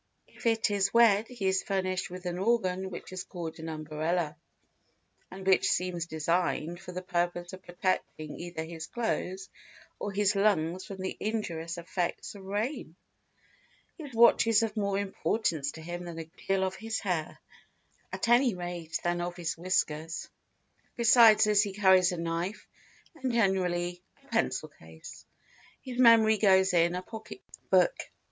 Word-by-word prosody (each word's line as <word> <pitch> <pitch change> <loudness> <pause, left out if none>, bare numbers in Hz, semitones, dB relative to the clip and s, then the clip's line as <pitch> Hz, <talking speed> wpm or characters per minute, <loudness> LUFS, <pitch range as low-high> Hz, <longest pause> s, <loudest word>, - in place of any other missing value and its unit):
If - - -6
it 225 -2 +2
is 195 -1 +1
wet 225 -2 +5
he 240 -6 -6
is 190 0 +2
furnished 185 -2 -2
with 180 +1 -9
an 175 0 -3
organ 190 -3 0
which 185 - -8
is 185 0 -4
called 170 -4 -7
an 160 0 -6
umbrella 155 +1 -2 0.9
and 190 0 -9
which 190 -1 +4
seems 175 -2 -1
designed 170 +1 -1
for 180 -1 -9
the 185 +1 -6
purpose 175 0 -2
of 185 - -9
protecting 175 -4 -3
either 170 -2 -5
his 160 -1 -7
clothes 195 -5 -3 0.5
or 205 - -3
his 205 +1 +1
lungs 185 -3 +1
from 195 - -8
the 190 - -3
injurious 170 -6 -3
effects 175 +1 -3
of 200 -2 -11
rain. 205 - -3 1.0
His 300 -5 -9
watch 235 0 +6
is 225 -1 +4
of 220 -1 -2
more 200 -2 0
importance 190 -6 -1
to 160 - -10
him 175 +1 -6
than 170 -1 -7
a 165 - -4
good 160 - -20
deal 195 0 +2
of 190 0 -1
his 225 0 -3
hair, 175 -6 -2 0.7
at - - -3
any 240 -2 +4
rate 175 -2 -4
than 175 0 0
of 175 0 -4
his 170 -2 -3
whiskers; 165 -2 -1 0.7
besides 230 -2 +7
this 210 -1 +4
he 205 -2 -2
carries 190 -2 +5
a 180 - -4
knife, 170 +4 -3 0.5
and 265 -6 -3
generally 180 -5 0 0.2
a - - -24
pencil - - 0
case. 80 0 -13 0.6
His 255 -1 -6
memory 225 -3 +6
goes 190 -2 +4
in 170 0 +3
a 180 - -4
pocket 220 - -9 0.3
book. - - +4
185 Hz, 160 wpm, -29 LUFS, 175-210 Hz, 1.0 s, besides